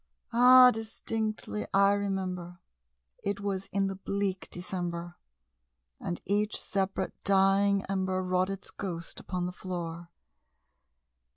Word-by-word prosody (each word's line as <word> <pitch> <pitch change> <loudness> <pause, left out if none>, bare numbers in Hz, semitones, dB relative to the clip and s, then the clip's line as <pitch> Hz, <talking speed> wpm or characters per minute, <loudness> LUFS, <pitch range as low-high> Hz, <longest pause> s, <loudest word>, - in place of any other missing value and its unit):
Ah, 250 +1 +9
distinctly 220 -1 -3
I 200 0 +6
remember, 185 -3 -3 0.7
it 200 0 -1
was 195 -1 -3
in 195 0 +1
the 195 - -1
bleak 195 -1 -2
December, 175 -1 -4 0.8
And 175 - -4
each 210 +2 +1
separate 195 0 -1
dying 195 +1 +3
ember 190 -1 -1
wrought 185 +1 +1
its 195 0 -6
ghost 170 -4 -6
upon 180 -1 -3
the 180 - -3
floor. 175 -2 -6
195 Hz, 110 wpm, -30 LUFS, 180-200 Hz, 0.8 s, Ah